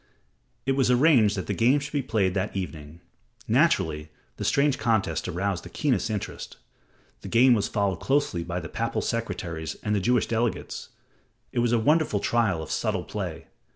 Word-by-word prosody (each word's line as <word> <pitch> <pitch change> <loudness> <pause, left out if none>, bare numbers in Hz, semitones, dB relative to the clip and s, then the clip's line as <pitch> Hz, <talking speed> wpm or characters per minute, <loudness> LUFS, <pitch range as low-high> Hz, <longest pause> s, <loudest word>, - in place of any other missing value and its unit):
It 135 - +1
was 135 -2 +2
arranged 125 -6 +4
that 95 - -3
the - - -2
game 125 +5 +3
should 145 +1 -7
be 145 - +1
played 100 -7 0
that 100 +1 -2
evening. 80 -3 -6 0.5
Naturally, 75 +1 +2 0.3
the - - -4
strange 140 -1 +2
contest 110 -9 0
aroused 90 +1 -2
the - - -9
keenest 135 -5 0
interest. 105 -2 -5 0.6
The - - -8
game 125 +2 +5
was 105 -3 +1
followed 100 -5 -1
closely 135 -11 0
by 85 +1 -3
the 80 - -6
papal 115 +8 -2
secretaries 85 -9 -3
and 105 - 0
the 105 - +2
Jewish 120 +4 +2
delegates. 115 0 -2 0.6
It - - -1
was 120 -1 +2
a 120 - +4
wonderful 150 -2 +2
trial 100 -8 +1
of - - -8
subtle - - -1
play. - - -5
110 Hz, 175 wpm, -26 LUFS, 90-125 Hz, 0.6 s, game